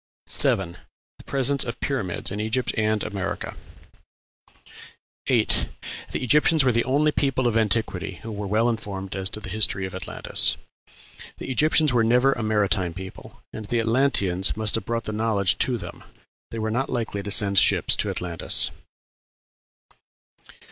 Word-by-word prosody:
7. 90 -2 +1 0.4
The - - -14
presence 140 0 +1
of 120 0 -6
pyramids 105 -13 -2
in 100 - -4
Egypt 110 +4 -1
and 110 -1 0
America. 100 -2 -5 1.7
8. - - +2 0.4
The - - -3
Egyptians 150 +4 +4
were 130 - +3
the 120 0 +1
only 145 +4 +2
people 135 -3 0
of 120 -2 +1
antiquity 105 -4 0
who 115 - -6
were 105 -1 -5
well 110 +4 +1
informed 100 -5 -4
as 95 0 -1
to 105 - -5
the - - -8
history 100 -2 +1
of 95 - -8
Atlantis. 95 -1 +2 0.8
The - - -6
Egyptians 155 +1 +3
were 120 -2 +3
never 125 +4 +3
a - - -6
maritime 100 -5 0
people, 95 0 -11
and 110 - -7
the 115 +3 -1
Atlanteans 115 -6 +1
must 110 -1 +2
have 110 -3 0
brought 115 0 -2
that 110 - -5
knowledge 105 -4 +1
to 125 -2 0
them. 90 -5 -9 0.5
They 115 - -7
were 110 0 -2
not 135 +4 -1
likely 115 -5 -3
to 100 - -6
send 100 -2 +3
ships - - +4
to - - -1
Atlantis. 85 -2 +2
110 Hz, 155 wpm, -24 LUFS, 100-125 Hz, 1.7 s, Egyptians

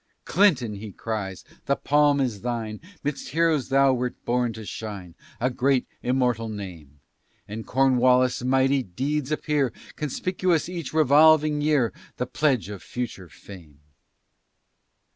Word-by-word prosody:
"Clinton," 140 - +3
he 105 +1 -8
cries, 95 -3 -5 0.2
"the 140 - +3
palm 145 0 +3
is 120 -7 -1
thine, 115 -3 -3 0.2
'Midst 145 0 -3
heroes 160 -4 +1
thou 135 0 +4
wert 125 0 -2
born 120 0 +1
to 110 0 -9
shine 100 -6 -7 0.3
A 125 +2 +1
great 130 +1 +1 0.2
immortal 125 -3 0
name, 85 -9 -8 0.5
And 110 +2 -7
Cornwallis' 130 -1 +3
mighty 135 +1 +3
deeds 135 +8 -3
appear 150 -4 0 0.3
Conspicuous 170 +3 0
each 175 -5 -5
revolving 155 0 +5
year, 145 -6 +2 0.2
The 125 - -1
pledge 130 -2 0
of 100 -2 -8
future 115 -7 -6
fame." 80 -8 -14
125 Hz, 125 wpm, -25 LUFS, 110-145 Hz, 0.5 s, revolving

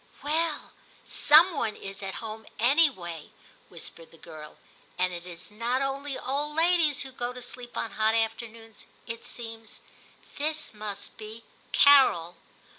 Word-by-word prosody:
'Well. 310 +1 -1 0.3
Some 330 +5 +6
one 225 -6 -1
is 195 0 -8
at 195 -1 -5
home 220 0 -7
anyway,' 230 - +2 0.4
whispered 165 -1 -6
the 165 - -18
girl, 155 -1 -11 0.4
'and 185 0 +1
it 175 +1 -7
is 175 +3 -11
not 240 +5 0
only 275 +1 -3
old 290 +3 -2
ladies 325 -4 +3
who 265 - -8
go 245 -1 -3
to 250 - -9
sleep 245 0 -8
on 225 - -2
hot 220 +1 +2
afternoons, 225 0 -3 0.2
it 230 +1 -7
seems: 225 -2 -9 0.6
this 305 -1 -2
must 210 -1 -7
be 220 +1 -9 0.2
" - - -32
Carol." 260 -12 +6
230 Hz, 145 wpm, -28 LUFS, 210-280 Hz, 0.6 s, Some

